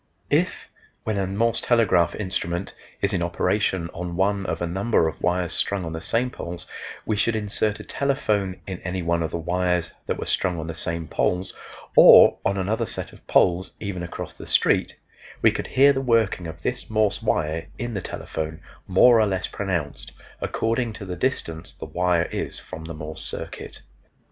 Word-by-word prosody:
If, -, -, 0 dB, 0.3 s
when 110 Hz, -2 st, -1 dB
a 95 Hz, -, 0 dB
Morse 115 Hz, +4 st, +1 dB
telegraph 100 Hz, -8 st, +3 dB
instrument 90 Hz, -2 st, -3 dB, 0.3 s
is 100 Hz, +1 st, +2 dB
in 90 Hz, -, 0 dB
operation 85 Hz, 0 st, 0 dB
on 85 Hz, 0 st, -5 dB
one 100 Hz, +1 st, +1 dB
of -, -, -2 dB
a 85 Hz, -, -1 dB
number 95 Hz, +1 st, +1 dB
of 80 Hz, -, -5 dB
wires 90 Hz, -1 st, +1 dB
strung 100 Hz, -3 st, 0 dB
on 80 Hz, -, -4 dB
the 80 Hz, -, -5 dB
same 115 Hz, +6 st, 0 dB
poles, 85 Hz, -6 st, -7 dB, 0.4 s
we 110 Hz, -, 0 dB
should 110 Hz, +2 st, +1 dB
insert 105 Hz, 0 st, +1 dB
a -, -, -7 dB
telephone 105 Hz, -9 st, -1 dB
in 95 Hz, -2 st, -5 dB
any 90 Hz, 0 st, -3 dB
one 85 Hz, 0 st, +1 dB
of 80 Hz, -, -1 dB
the -, -, -3 dB
wires 90 Hz, +1 st, 0 dB, 0.2 s
that -, -, -1 dB
were -, -, -4 dB
strung 90 Hz, -2 st, +3 dB
on 80 Hz, -, -4 dB
the 80 Hz, -, -4 dB
same 85 Hz, 0 st, -3 dB
poles 90 Hz, +4 st, 0 dB, 0.4 s
or -, -, +9 dB
on 100 Hz, 0 st, +1 dB
another 110 Hz, +4 st, -1 dB
set -, -, -4 dB
of -, -, -18 dB
poles 90 Hz, +1 st, +3 dB
even 100 Hz, -4 st, -4 dB
across 85 Hz, -, -6 dB
the -, -, -11 dB
street, -, -, +2 dB, 0.5 s
we -, -, +7 dB
could -, -, -4 dB
hear 140 Hz, +2 st, +5 dB
the 135 Hz, -, -1 dB
working 115 Hz, -8 st, +1 dB
of 80 Hz, -1 st, -9 dB
this -, -, -2 dB
Morse 110 Hz, -1 st, +1 dB
wire 80 Hz, -7 st, -1 dB
in 120 Hz, -1 st, -4 dB
the 100 Hz, -, -2 dB
telephone, 80 Hz, -2 st, -5 dB, 0.3 s
more 115 Hz, +5 st, +6 dB
or 110 Hz, -, +4 dB
less 95 Hz, -2 st, -1 dB
pronounced, 85 Hz, -7 st, -3 dB, 0.3 s
according 115 Hz, 0 st, -1 dB
to 105 Hz, -2 st, -8 dB
the 90 Hz, -1 st, -4 dB
distance 85 Hz, -7 st, -2 dB
the -, -, -8 dB
wire 90 Hz, -1 st, +1 dB
is -, -, -4 dB
from 80 Hz, 0 st, -9 dB
the 80 Hz, -1 st, -6 dB
Morse 75 Hz, 0 st, -7 dB
circuit. -, -, -6 dB
95 Hz, 190 wpm, -24 LUFS, 85-110 Hz, 0.5 s, or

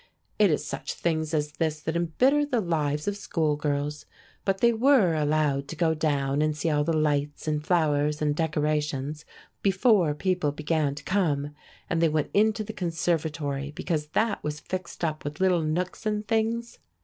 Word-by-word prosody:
It 210 Hz, -2 st, +6 dB
is 150 Hz, -1 st, 0 dB
such 135 Hz, -1 st, -5 dB
things 160 Hz, -2 st, -1 dB
as 150 Hz, -2 st, 0 dB
this 155 Hz, 0 st, -1 dB
that 160 Hz, +2 st, -3 dB
embitter 250 Hz, -, +2 dB
the 275 Hz, -5 st, 0 dB
lives 150 Hz, -5 st, -1 dB
of 205 Hz, -, 0 dB
schoolgirls. 150 Hz, -5 st, -1 dB, 0.4 s
But 195 Hz, -1 st, +1 dB
they 235 Hz, +2 st, +4 dB
were 230 Hz, -6 st, +4 dB
allowed 150 Hz, -2 st, +1 dB
to 165 Hz, -, -6 dB
go 165 Hz, 0 st, +2 dB
down 145 Hz, -2 st, 0 dB
and 155 Hz, 0 st, 0 dB
see 160 Hz, +1 st, 0 dB
all 150 Hz, -1 st, +2 dB
the 165 Hz, -, 0 dB
lights 145 Hz, -1 st, 0 dB
and 150 Hz, -1 st, 0 dB
flowers 150 Hz, -3 st, +1 dB
and 150 Hz, -1 st, +1 dB
decorations 150 Hz, -2 st, -1 dB, 0.4 s
before 195 Hz, -5 st, +3 dB
people 180 Hz, -2 st, 0 dB
began 150 Hz, -1 st, 0 dB
to -, -, -9 dB
come, 150 Hz, -7 st, 0 dB, 0.3 s
and 165 Hz, -2 st, 0 dB
they 165 Hz, -, +4 dB
went 155 Hz, -1 st, -1 dB
into 215 Hz, +1 st, +3 dB
the 220 Hz, +1 st, -7 dB
conservatory 160 Hz, -5 st, -2 dB
because 155 Hz, -1 st, -3 dB
that 220 Hz, -1 st, +1 dB
was 150 Hz, 0 st, -3 dB
fixed 185 Hz, +2 st, -6 dB
up 155 Hz, -1 st, -3 dB
with 145 Hz, +1 st, -5 dB
little 185 Hz, -2 st, +3 dB
nooks 175 Hz, +7 st, -2 dB
and 210 Hz, 0 st, -1 dB
things. 230 Hz, +1 st, -1 dB
155 Hz, 175 wpm, -27 LUFS, 150-185 Hz, 0.4 s, It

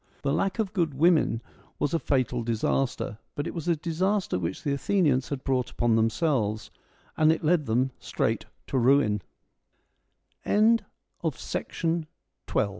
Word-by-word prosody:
The 140 Hz, -, +1 dB
lack 195 Hz, +1 st, 0 dB
of 215 Hz, -3 st, -1 dB
good 165 Hz, -8 st, 0 dB
women 155 Hz, -6 st, +3 dB, 0.3 s
was 145 Hz, -, -1 dB
a 165 Hz, -, +2 dB
fatal 130 Hz, -4 st, 0 dB
disaster, 115 Hz, 0 st, -1 dB, 0.2 s
but 145 Hz, -, -2 dB
it 170 Hz, -, -4 dB
was 165 Hz, -1 st, -5 dB
a 170 Hz, -, +3 dB
disaster 180 Hz, -, 0 dB
which 90 Hz, +1 st, -4 dB
the 145 Hz, -, 0 dB
Athenians 140 Hz, -4 st, +1 dB
had 140 Hz, -2 st, -4 dB
brought 130 Hz, -2 st, 0 dB
upon 120 Hz, -2 st, +1 dB
themselves, 115 Hz, -2 st, 0 dB, 0.4 s
and 155 Hz, 0 st, +5 dB
it 160 Hz, -, -1 dB
led 155 Hz, -2 st, +2 dB
them 125 Hz, +4 st, +1 dB
straight -, -, -1 dB, 0.2 s
to 125 Hz, -5 st, +3 dB
140 Hz, 125 wpm, -27 LUFS, 120-165 Hz, 0.4 s, and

